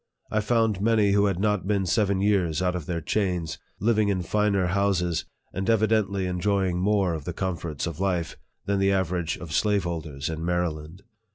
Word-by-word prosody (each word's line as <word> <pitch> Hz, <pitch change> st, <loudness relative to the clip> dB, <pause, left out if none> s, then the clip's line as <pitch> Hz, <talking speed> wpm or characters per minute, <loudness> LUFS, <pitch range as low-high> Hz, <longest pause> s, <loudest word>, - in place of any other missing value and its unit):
I 110 Hz, -, +2 dB
found 110 Hz, -2 st, +1 dB
many, 110 Hz, -2 st, +3 dB
who 100 Hz, 0 st, +4 dB
had 95 Hz, -3 st, -1 dB
not 105 Hz, -2 st, 0 dB
been 100 Hz, -2 st, +1 dB
seven 100 Hz, 0 st, +1 dB
years 95 Hz, -6 st, +2 dB
out 90 Hz, -1 st, 0 dB
of 85 Hz, -4 st, -5 dB
their 85 Hz, -2 st, -2 dB
chains, 90 Hz, -1 st, -1 dB, 0.2 s
Jiving 110 Hz, 0 st, +2 dB
in 95 Hz, -3 st, 0 dB
finer 100 Hz, 0 st, +1 dB
houses, 90 Hz, -2 st, 0 dB, 0.3 s
and 95 Hz, +3 st, -2 dB
evidently 110 Hz, -3 st, +2 dB
enjoying 90 Hz, 0 st, 0 dB
more 95 Hz, -2 st, +2 dB
of 80 Hz, -3 st, -5 dB
the 90 Hz, -, -3 dB
comforts 85 Hz, -5 st, -3 dB
of 85 Hz, -2 st, -5 dB
life, 90 Hz, -4 st, -1 dB, 0.3 s
than 100 Hz, -1 st, 0 dB
the 95 Hz, 0 st, +3 dB
average 90 Hz, -3 st, 0 dB
of 85 Hz, -3 st, -9 dB
slaveholders 85 Hz, -8 st, -1 dB
in 80 Hz, 0 st, -4 dB
Maryland. 85 Hz, -1 st, -2 dB
95 Hz, 175 wpm, -26 LUFS, 85-100 Hz, 0.3 s, who